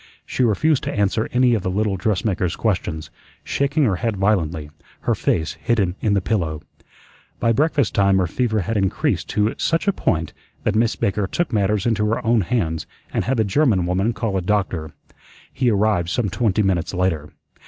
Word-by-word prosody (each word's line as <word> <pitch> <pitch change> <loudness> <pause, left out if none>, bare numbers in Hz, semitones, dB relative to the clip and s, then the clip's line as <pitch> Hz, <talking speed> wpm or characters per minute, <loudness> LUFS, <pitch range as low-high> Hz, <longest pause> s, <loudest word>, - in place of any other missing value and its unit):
She 130 - -1
refused 130 +7 +2
to - - -1
answer 105 +2 0
any 125 0 +3
of 110 - +1
the 95 - -2
little 100 +1 0
dressmaker's 95 -2 0
questions, 90 -7 -2 0.3
shaking 140 +2 0
her 100 -8 +2
head 110 +1 -2
violently, 85 -7 0 0.3
her - - +1
face 80 0 0
hidden 100 -7 +1
in 105 -2 +2
the 100 - +2
pillow. 80 -7 -1 0.8
By 115 - +2
breakfast 145 -1 +1
time 100 -1 +3
her 95 - +2
fever 110 +3 0
had 105 +5 -2
increased 95 -2 0
to 105 +1 +1
such 165 +3 0
a 200 - +4
point 80 - -1 0.3
that 105 - +1
Miss 115 +1 +2
Baker 100 0 0
took 170 - -2
matters 105 -1 +1
into 105 -3 +1
her 115 +2 -1
own 115 -1 +3
hands 85 -7 -1 0.3
and - - 0
had 130 +1 0
the 110 - +3
German 105 - +2
woman 95 +5 +1
call 105 -2 -2
a - - 0
doctor. 90 -5 -1 0.6
He 130 -2 +1
arrived 100 -5 +1
some 110 +1 0
twenty 110 -2 +1
minutes 95 -1 0
later. 85 -5 -1
105 Hz, 185 wpm, -21 LUFS, 90-115 Hz, 0.8 s, a